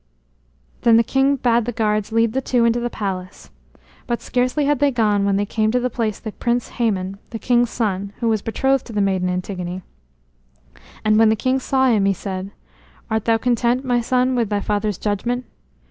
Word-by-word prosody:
Then 230 Hz, -1 st, +5 dB
the 230 Hz, -, +5 dB
king 270 Hz, +4 st, +2 dB
bade 235 Hz, -3 st, +1 dB
the 245 Hz, -, -2 dB
guards 215 Hz, -2 st, -1 dB
lead 230 Hz, 0 st, +2 dB
the 265 Hz, -, 0 dB
two 245 Hz, -2 st, +1 dB
into 235 Hz, +1 st, +2 dB
the 240 Hz, 0 st, -2 dB
palace. 190 Hz, -4 st, -5 dB, 0.6 s
But 240 Hz, -1 st, -1 dB
scarcely 255 Hz, +4 st, 0 dB
had 290 Hz, -2 st, +1 dB
they 285 Hz, -, +4 dB
gone 210 Hz, -5 st, +1 dB
when 200 Hz, -1 st, +2 dB
there 205 Hz, +1 st, +1 dB
came 215 Hz, +1 st, 0 dB
to 250 Hz, +3 st, +1 dB
the 250 Hz, 0 st, -2 dB
place 220 Hz, -4 st, -2 dB
the 220 Hz, -, -6 dB
Prince 240 Hz, +2 st, -2 dB
Hæmon, 195 Hz, -5 st, -1 dB
the 230 Hz, -, -5 dB
king's 240 Hz, +1 st, +2 dB
son, 200 Hz, -4 st, -2 dB
who 235 Hz, -, -2 dB
was 220 Hz, -2 st, +1 dB
betrothed 265 Hz, +4 st, 0 dB
to 230 Hz, -, -9 dB
the 210 Hz, -, -1 dB
maiden 190 Hz, -2 st, +1 dB
Antigone. 180 Hz, 0 st, -4 dB, 1.2 s
And 215 Hz, 0 st, +4 dB
when 225 Hz, -1 st, +6 dB
the 220 Hz, -, +3 dB
king 255 Hz, +4 st, 0 dB
saw 265 Hz, 0 st, +1 dB
him, 215 Hz, -5 st, +3 dB
he 195 Hz, -, +3 dB
said: 190 Hz, 0 st, -5 dB, 0.6 s
"Art 220 Hz, -1 st, 0 dB
thou 230 Hz, -1 st, +3 dB
content, 245 Hz, +2 st, +1 dB
my 245 Hz, -1 st, +1 dB
son, 255 Hz, +2 st, +1 dB
with 235 Hz, -4 st, 0 dB
thy 205 Hz, -1 st, 0 dB
father's 210 Hz, -2 st, -1 dB
judgment?" 240 Hz, +5 st, -2 dB
225 Hz, 200 wpm, -21 LUFS, 205-245 Hz, 1.2 s, when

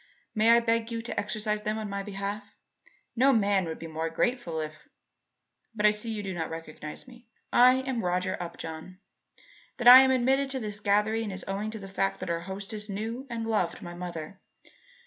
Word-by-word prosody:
May 220 Hz, 0 st, +3 dB
I 235 Hz, 0 st, +8 dB
beg 230 Hz, 0 st, 0 dB
you 230 Hz, 0 st, -3 dB
to 240 Hz, -, -3 dB
exercise 210 Hz, +1 st, -2 dB
them 215 Hz, 0 st, -2 dB
in 215 Hz, -1 st, -4 dB
my 200 Hz, 0 st, -3 dB
behalf? 200 Hz, +1 st, -5 dB, 0.6 s
No 265 Hz, +3 st, +5 dB
man 200 Hz, -5 st, +2 dB
would 160 Hz, -1 st, -5 dB
be 165 Hz, -, -8 dB
more 160 Hz, 0 st, -3 dB
grateful 175 Hz, -2 st, -1 dB
if 155 Hz, 0 st, -7 dB, 0.9 s
But 210 Hz, -1 st, 0 dB
I 210 Hz, -, +7 dB
see 210 Hz, +2 st, -4 dB
that 220 Hz, -, -2 dB
you 205 Hz, -, -4 dB
do 190 Hz, -1 st, -4 dB
not 165 Hz, -2 st, -3 dB
recognize 160 Hz, -, -7 dB
me. 245 Hz, -2 st, -16 dB, 0.3 s
I 255 Hz, +2 st, +6 dB
am 260 Hz, -3 st, -2 dB
Roger 180 Hz, +1 st, 0 dB
Upjohn. 170 Hz, +1 st, -7 dB, 0.8 s
That 240 Hz, -2 st, 0 dB
I 250 Hz, +1 st, +13 dB
am 265 Hz, -, +4 dB
admitted 265 Hz, +2 st, +2 dB
to 265 Hz, -1 st, -2 dB
this 210 Hz, -3 st, -5 dB
gathering 210 Hz, +2 st, +1 dB
is 190 Hz, 0 st, -6 dB
owing 200 Hz, +2 st, -2 dB
to 220 Hz, -, -6 dB
the 195 Hz, -, -9 dB
fact 195 Hz, 0 st, -1 dB
that -, -, -3 dB
our 170 Hz, -, -1 dB
hostess 200 Hz, +4 st, -6 dB
knew 225 Hz, +6 st, -4 dB
and 230 Hz, -1 st, -3 dB
loved 215 Hz, -6 st, -1 dB
my 175 Hz, -, -7 dB
mother. 175 Hz, +1 st, -7 dB
210 Hz, 200 wpm, -28 LUFS, 185-230 Hz, 0.9 s, I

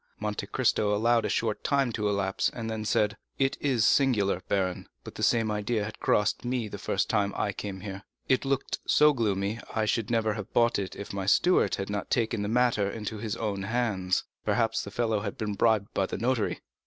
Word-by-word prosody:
Monte 105 Hz, -1 st, -3 dB
Cristo 105 Hz, -3 st, +1 dB
allowed 115 Hz, +1 st, +2 dB
a -, -, -1 dB
short 110 Hz, -2 st, -1 dB
time 140 Hz, -3 st, +2 dB
to 105 Hz, -2 st, -1 dB
elapse, 100 Hz, -1 st, 0 dB
and 115 Hz, -2 st, -5 dB
then 110 Hz, -1 st, -4 dB
said: 105 Hz, 0 st, +1 dB, 0.2 s
"It 135 Hz, 0 st, +1 dB
is 125 Hz, -7 st, +2 dB
singular, 105 Hz, -9 st, +3 dB
baron, 95 Hz, -2 st, -1 dB, 0.2 s
but -, -, -9 dB
the -, -, -8 dB
same 115 Hz, -2 st, +2 dB
idea 105 Hz, +1 st, -1 dB
came 105 Hz, -, -3 dB
across 105 Hz, -1 st, 0 dB
me 120 Hz, -2 st, -1 dB
the -, -, -7 dB
first -, -, 0 dB
time 100 Hz, -1 st, 0 dB
I 100 Hz, -, 0 dB
came 95 Hz, -1 st, -6 dB
here; 100 Hz, -1 st, -6 dB, 0.3 s
it 130 Hz, -, +2 dB
looked 135 Hz, -1 st, -1 dB
so 150 Hz, 0 st, +5 dB
gloomy 105 Hz, -3 st, -1 dB, 0.2 s
I 110 Hz, -1 st, +1 dB
should 110 Hz, 0 st, 0 dB
never 110 Hz, -2 st, +1 dB
have 105 Hz, 0 st, -7 dB
bought 120 Hz, -1 st, +3 dB
it 95 Hz, -2 st, -4 dB
if 100 Hz, -, -7 dB
my 95 Hz, -1 st, -3 dB
steward 180 Hz, -, +4 dB
had 100 Hz, +1 st, -4 dB
not 100 Hz, 0 st, -3 dB
taken 115 Hz, -2 st, 0 dB
the 100 Hz, -, -2 dB
matter 115 Hz, -4 st, +2 dB
into 110 Hz, 0 st, -5 dB
his 110 Hz, 0 st, -3 dB
own 105 Hz, -4 st, -2 dB
hands. 100 Hz, -4 st, 0 dB, 0.2 s
Perhaps -, -, +1 dB
the -, -, -7 dB
fellow 110 Hz, -3 st, 0 dB
had 100 Hz, -1 st, -5 dB
been 105 Hz, -1 st, -2 dB
bribed 105 Hz, 0 st, +2 dB
by 95 Hz, -, +1 dB
the -, -, -4 dB
notary." 120 Hz, -2 st, 0 dB
110 Hz, 210 wpm, -28 LUFS, 100-115 Hz, 0.3 s, so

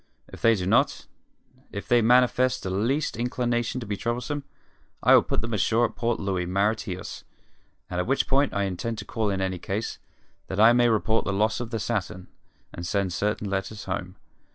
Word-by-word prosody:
If -, -, -12 dB
they 115 Hz, 0 st, +5 dB
do 90 Hz, -3 st, -3 dB
not 95 Hz, -, +2 dB, 0.7 s
if 100 Hz, -, -6 dB
they 120 Hz, -1 st, +4 dB
manifest 125 Hz, +2 st, +3 dB
the 95 Hz, -, -3 dB
least 120 Hz, +10 st, 0 dB
inclination 120 Hz, 0 st, -1 dB
to -, -, -5 dB
be 105 Hz, -1 st, -2 dB
troublesome 125 Hz, +6 st, -3 dB, 0.6 s
I -, -, +6 dB
will -, -, +8 dB
put -, -, -2 dB
them 115 Hz, +1 st, -4 dB
ashore 115 Hz, +3 st, +2 dB
at 110 Hz, -1 st, -5 dB
Port 120 Hz, 0 st, -1 dB
Louis, 95 Hz, -3 st, -1 dB
Mauritius, 100 Hz, 0 st, -2 dB, 0.6 s
at 90 Hz, +2 st, -2 dB
which 135 Hz, +2 st, +1 dB
port 140 Hz, +1 st, +2 dB
I 100 Hz, -, 0 dB
intend 100 Hz, +4 st, -3 dB
to 105 Hz, -, -6 dB
call 110 Hz, -1 st, -1 dB
in 95 Hz, -1 st, -1 dB
any 95 Hz, -1 st, -2 dB
case, 100 Hz, +5 st, -4 dB, 0.5 s
that 95 Hz, -, -4 dB
I 115 Hz, +2 st, +8 dB
may 120 Hz, 0 st, +4 dB
report 110 Hz, 0 st, +1 dB
the -, -, 0 dB
loss 110 Hz, +3 st, +1 dB
of 120 Hz, -2 st, -4 dB
the 115 Hz, -, -2 dB
Saturn, 100 Hz, -4 st, -3 dB, 0.4 s
and 85 Hz, -, -7 dB
send 95 Hz, +1 st, -1 dB
certain 105 Hz, +2 st, -1 dB
letters 100 Hz, +1 st, -3 dB
home. 95 Hz, 0 st, -4 dB
110 Hz, 190 wpm, -26 LUFS, 95-120 Hz, 0.7 s, will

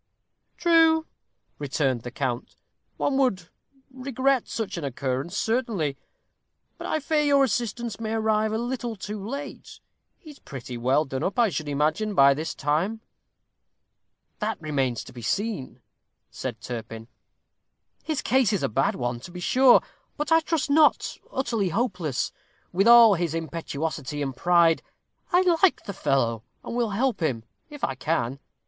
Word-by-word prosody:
"True," 325 Hz, -2 st, +4 dB, 0.5 s
returned 135 Hz, -3 st, 0 dB
the 120 Hz, -, -6 dB
count; 120 Hz, -1 st, -3 dB, 0.4 s
"one 270 Hz, -, 0 dB
would 195 Hz, -11 st, +1 dB, 0.4 s
regret 260 Hz, 0 st, 0 dB
such 225 Hz, -3 st, -4 dB
an 170 Hz, -, -5 dB
occurrence, 135 Hz, +6 st, -3 dB
certainly. 220 Hz, -, 0 dB, 0.8 s
But -, -, -5 dB
I 310 Hz, -, 0 dB
fear 310 Hz, +1 st, +1 dB
your 285 Hz, -2 st, +4 dB
assistance 235 Hz, -2 st, -2 dB
may 220 Hz, -1 st, -3 dB
arrive 220 Hz, -1 st, +1 dB
a 220 Hz, -, 0 dB
little 240 Hz, -1 st, -3 dB
too 205 Hz, 0 st, -6 dB
late. 280 Hz, +7 st, -7 dB, 0.4 s
He 315 Hz, -5 st, -13 dB
is 285 Hz, -, -16 dB
pretty 125 Hz, -2 st, -8 dB
well 130 Hz, +6 st, +2 dB
done 135 Hz, -1 st, -4 dB
up, 190 Hz, -, -2 dB
I 235 Hz, -3 st, +4 dB
should 155 Hz, -4 st, -4 dB
imagine, 155 Hz, +9 st, 0 dB
by 140 Hz, -2 st, +7 dB
this 155 Hz, +3 st, -4 dB
time." 170 Hz, +10 st, -1 dB, 1.4 s
"That 220 Hz, +1 st, -2 dB
remains 135 Hz, -7 st, -1 dB
to -, -, -13 dB
be 120 Hz, -, -9 dB
seen," 200 Hz, -, -3 dB, 0.5 s
said -, -, -5 dB
Turpin. 115 Hz, -2 st, -7 dB, 1.0 s
"His 310 Hz, -3 st, -2 dB
case 255 Hz, -5 st, +3 dB
is 205 Hz, -, -1 dB
a -, -, +1 dB
bad 135 Hz, +5 st, +1 dB
one, 120 Hz, -1 st, -2 dB
to 125 Hz, -, -10 dB
be 180 Hz, -, -8 dB
sure, 255 Hz, +7 st, +5 dB, 0.4 s
but 300 Hz, +2 st, -3 dB
I 325 Hz, -, +7 dB
trust 320 Hz, -2 st, -1 dB
not 305 Hz, +1 st, +4 dB, 0.2 s
utterly 230 Hz, -7 st, -1 dB
hopeless. 180 Hz, -, -1 dB, 0.4 s
With 195 Hz, +5 st, +2 dB
all 235 Hz, -2 st, +9 dB
his 170 Hz, -3 st, -1 dB
impetuosity 155 Hz, -2 st, -4 dB
and 135 Hz, -2 st, -4 dB
pride, 170 Hz, +2 st, +4 dB, 0.5 s
I 360 Hz, -, +5 dB, 0.2 s
like 385 Hz, -, +4 dB
the 200 Hz, -, -6 dB
fellow, 125 Hz, -, 0 dB, 0.2 s
and -, -, -6 dB
will 240 Hz, -2 st, +1 dB
help 230 Hz, +2 st, 0 dB
him, 130 Hz, -9 st, -1 dB, 0.3 s
if 295 Hz, -2 st, -11 dB
I 135 Hz, -, +1 dB
can. 135 Hz, -2 st, -2 dB
195 Hz, 155 wpm, -25 LUFS, -, 1.4 s, all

